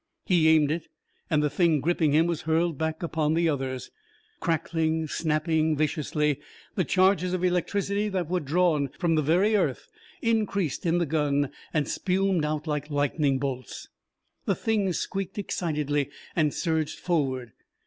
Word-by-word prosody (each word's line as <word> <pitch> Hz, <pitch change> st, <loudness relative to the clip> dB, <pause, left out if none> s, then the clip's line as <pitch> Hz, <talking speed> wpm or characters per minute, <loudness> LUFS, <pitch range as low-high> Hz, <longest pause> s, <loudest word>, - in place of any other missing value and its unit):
He 175 Hz, -6 st, +3 dB
aimed 155 Hz, -2 st, +5 dB
it, 160 Hz, 0 st, -3 dB, 0.4 s
and 150 Hz, -2 st, +2 dB
the 150 Hz, -, +2 dB
Thing 160 Hz, -1 st, +3 dB
gripping 160 Hz, +1 st, +1 dB
him 155 Hz, +3 st, +4 dB
was 170 Hz, -2 st, -1 dB
hurled 160 Hz, +1 st, +1 dB
back 160 Hz, +3 st, -3 dB
upon 160 Hz, -2 st, 0 dB
the 170 Hz, 0 st, +2 dB
others. 135 Hz, -4 st, -2 dB, 0.5 s
Crackling, 160 Hz, -1 st, 0 dB
snapping 155 Hz, 0 st, +1 dB
viciously, 150 Hz, -1 st, 0 dB, 0.3 s
the 185 Hz, -, +1 dB
charges 185 Hz, +1 st, +2 dB
of 185 Hz, -1 st, -1 dB
electricity 200 Hz, +3 st, 0 dB
that 185 Hz, -4 st, -2 dB
were 180 Hz, +2 st, 0 dB
drawn 155 Hz, -1 st, +2 dB
from 170 Hz, -3 st, +1 dB
the 155 Hz, -, +3 dB
very 180 Hz, +9 st, +3 dB
earth 205 Hz, -, 0 dB, 0.4 s
increased 200 Hz, -, 0 dB
in 165 Hz, +1 st, +3 dB
the 175 Hz, -, +1 dB
gun 145 Hz, -2 st, 0 dB, 0.2 s
and 150 Hz, -2 st, 0 dB
spumed 190 Hz, -2 st, +1 dB
out 150 Hz, 0 st, -2 dB
like 150 Hz, -1 st, -2 dB
lightning 145 Hz, -1 st, +1 dB
bolts. 130 Hz, -3 st, -5 dB, 0.6 s
The -, -, +1 dB
Things 205 Hz, -5 st, 0 dB
squeaked 195 Hz, 0 st, -4 dB
excitedly 150 Hz, -7 st, -1 dB, 0.3 s
and 155 Hz, -3 st, +2 dB
surged 160 Hz, -2 st, -1 dB
forward. 135 Hz, -9 st, -1 dB
160 Hz, 150 wpm, -27 LUFS, 150-180 Hz, 0.6 s, aimed